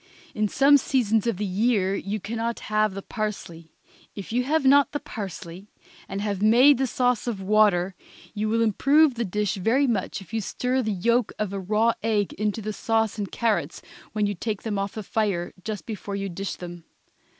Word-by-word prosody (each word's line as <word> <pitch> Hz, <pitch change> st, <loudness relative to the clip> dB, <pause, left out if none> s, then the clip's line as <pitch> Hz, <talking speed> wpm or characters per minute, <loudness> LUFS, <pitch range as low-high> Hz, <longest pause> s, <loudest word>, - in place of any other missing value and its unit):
In 215 Hz, 0 st, 0 dB
some 280 Hz, +6 st, +5 dB
seasons 235 Hz, -5 st, +1 dB
of 230 Hz, -6 st, 0 dB
the 210 Hz, -, -2 dB
year 200 Hz, 0 st, +1 dB
you 200 Hz, +2 st, -3 dB
can 225 Hz, +4 st, -5 dB
not 230 Hz, +1 st, -2 dB
have 215 Hz, -2 st, 0 dB
the 195 Hz, -, -6 dB
parsley. 175 Hz, -7 st, -5 dB, 0.4 s
If 200 Hz, +2 st, -7 dB
you 250 Hz, +1 st, +2 dB
have 300 Hz, +1 st, +1 dB
not 280 Hz, +1 st, +6 dB
parsley, 190 Hz, -2 st, -7 dB, 0.4 s
and 195 Hz, +1 st, -3 dB
have 200 Hz, -2 st, -2 dB
made 245 Hz, +6 st, +6 dB
the 265 Hz, -, +1 dB
sauce 250 Hz, -1 st, 0 dB
of 225 Hz, -5 st, -2 dB
water, 195 Hz, -2 st, +3 dB, 0.4 s
you 215 Hz, 0 st, -2 dB
will 230 Hz, +1 st, +2 dB
improve 275 Hz, +7 st, +4 dB
the 235 Hz, 0 st, -2 dB
dish 210 Hz, +1 st, -1 dB
very 230 Hz, +9 st, +2 dB
much 220 Hz, -8 st, -1 dB
if 195 Hz, 0 st, -14 dB
you 225 Hz, -, 0 dB
stir 255 Hz, +5 st, -1 dB
the 220 Hz, -3 st, -1 dB
yolk 235 Hz, +5 st, +1 dB
of 210 Hz, -2 st, -2 dB
a 200 Hz, -, -3 dB
raw 215 Hz, +4 st, +2 dB
egg 210 Hz, -2 st, 0 dB
into 210 Hz, +1 st, -2 dB
the 215 Hz, +1 st, -3 dB
sauce 225 Hz, -1 st, 0 dB
and 200 Hz, -2 st, -4 dB
carrots 200 Hz, -10 st, -1 dB, 0.3 s
when 210 Hz, -1 st, 0 dB
you 205 Hz, -, 0 dB
take 210 Hz, +3 st, -4 dB
them 210 Hz, -3 st, -2 dB
off 200 Hz, 0 st, -3 dB
the 215 Hz, -, -6 dB
fire, 200 Hz, -4 st, -1 dB
just 215 Hz, -3 st, -5 dB
before 205 Hz, -2 st, -5 dB
you 195 Hz, 0 st, -3 dB
dish 195 Hz, +2 st, -4 dB
them. 175 Hz, -1 st, -9 dB
215 Hz, 195 wpm, -25 LUFS, 195-230 Hz, 0.4 s, not